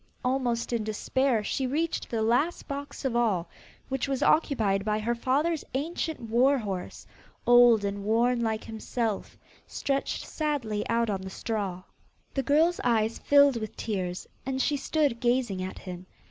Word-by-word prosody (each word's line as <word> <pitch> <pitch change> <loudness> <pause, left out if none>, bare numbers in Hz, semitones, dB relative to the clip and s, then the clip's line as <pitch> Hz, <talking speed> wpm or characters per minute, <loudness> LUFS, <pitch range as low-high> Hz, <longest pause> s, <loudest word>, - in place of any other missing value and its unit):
Almost 250 -2 0
in 230 -2 0
despair 225 +2 0
she 265 +5 -1
reached 315 +5 -1
the 225 -2 -1
last 245 +10 +1
box 280 0 -6
of 255 -3 0
all, 205 -8 +1 0.4
which 265 0 -2
was 275 0 -1
occupied 220 -11 +2
by 210 0 0
her 220 +2 0
father's 285 +7 0
ancient 320 +2 -2
war 245 +5 +3
horse, 195 -6 -5 0.4
old 240 -3 +6
and 200 0 -3
worn 235 +3 +2
like 220 -1 -1
himself, 220 -1 -3 0.3
stretched 275 0 -2
sadly 265 -9 -2
out 230 -1 +1
on 195 -2 -2
the 190 - -6
straw. 195 -3 -3 0.5
The 270 - 0
girl's 310 +7 +3
eyes 225 -2 +1
filled 285 -3 +5
with 215 -2 -6
tears, 185 -4 -3 0.2
and 265 0 -2
she 290 +2 +2
stood 285 -4 0
gazing 240 -6 +1
at 185 0 -5
him. 180 -1 -8
235 Hz, 155 wpm, -28 LUFS, 215-275 Hz, 0.5 s, old